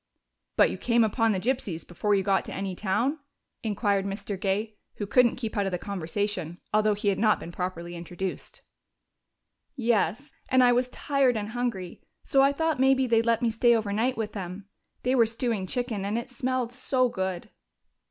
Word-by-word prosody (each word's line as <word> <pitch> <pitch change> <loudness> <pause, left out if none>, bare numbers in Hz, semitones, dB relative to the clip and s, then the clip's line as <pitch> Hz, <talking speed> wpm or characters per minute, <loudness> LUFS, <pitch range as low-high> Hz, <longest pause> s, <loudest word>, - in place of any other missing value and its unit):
"But - - +5
you - - -6
came 235 -1 +3
upon 225 +1 +2
the 190 - 0
gypsies 205 - -2
before 205 +4 0
you 195 - +1
got 195 0 +2
to - - -7
any 190 -1 -3
town?" 225 - 0 0.4
inquired 205 -2 0
Mr. 200 +1 -4
Gay, 205 +3 -2 0.2
who 205 - -3
couldn't 240 +3 +4
keep 235 -2 -5
out 200 -2 +1
of - - -2
the 180 - -1
conversation, 185 -1 -3
although 215 0 +3
he 205 0 0
had 195 - 0
not 215 -1 +3
been 170 - -8
properly 175 -1 -4
introduced. 175 +2 -6 1.1
"Yes. 235 - 0 0.2
And 260 -1 +5
I 245 - +6
was 250 +1 +2
tired 270 -2 +1
and 210 0 -3
hungry, 220 -7 -3 0.2
so 270 - +3
I 275 +1 +5
thought 320 -1 0
maybe 265 0 +4
they'd 230 -1 +2
let 230 +1 +2
me 230 - +2
stay 235 +1 +4
overnight 220 +3 0
with 215 -2 -3
them. 190 0 -6 0.4
They 250 - +2
were 235 -3 +5
stewing 225 -4 -1
chicken, 240 -3 -2
and 205 +3 -1
it 235 +2 -5
smelled 255 -1 -1
so 255 0 +1
good." 190 -5 -4
215 Hz, 185 wpm, -27 LUFS, 195-245 Hz, 1.1 s, I